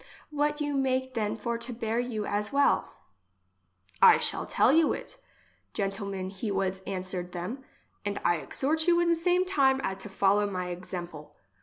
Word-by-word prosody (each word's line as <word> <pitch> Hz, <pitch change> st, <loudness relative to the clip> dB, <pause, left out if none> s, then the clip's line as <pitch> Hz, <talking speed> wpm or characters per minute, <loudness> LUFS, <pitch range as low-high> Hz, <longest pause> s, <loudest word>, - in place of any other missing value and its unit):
What 295 Hz, 0 st, 0 dB
you 290 Hz, -1 st, -1 dB
make 260 Hz, -1 st, 0 dB
then 215 Hz, -2 st, -1 dB
for 235 Hz, +1 st, -3 dB
to 235 Hz, +2 st, -6 dB
bear 230 Hz, -1 st, -2 dB
you 235 Hz, -4 st, -2 dB
as 210 Hz, +1 st, -2 dB
well? 280 Hz, 0 st, +2 dB, 0.5 s
— 90 Hz, 0 st, -31 dB
I -, -, +4 dB
shall -, -, -2 dB
tell -, -, +4 dB
you 320 Hz, +1 st, +4 dB
it, -, -, -7 dB, 0.6 s
gentlemen 195 Hz, -1 st, -3 dB
he 200 Hz, +3 st, -4 dB
was 190 Hz, -1 st, -1 dB
an 190 Hz, -2 st, -3 dB
swered 180 Hz, -1 st, -4 dB
them, 200 Hz, +10 st, -5 dB, 0.4 s
and 205 Hz, -1 st, -2 dB
I 175 Hz, -, +4 dB
exhort 310 Hz, -, -1 dB
you 345 Hz, 0 st, +5 dB
in 340 Hz, -1 st, +3 dB
same 355 Hz, +2 st, +2 dB
time 270 Hz, -8 st, +3 dB
at 190 Hz, 0 st, -2 dB
to 210 Hz, -, -9 dB
follow 200 Hz, +1 st, +2 dB
my 180 Hz, -2 st, -3 dB
exemple. 175 Hz, -3 st, -7 dB
210 Hz, 175 wpm, -28 LUFS, 185-270 Hz, 0.6 s, you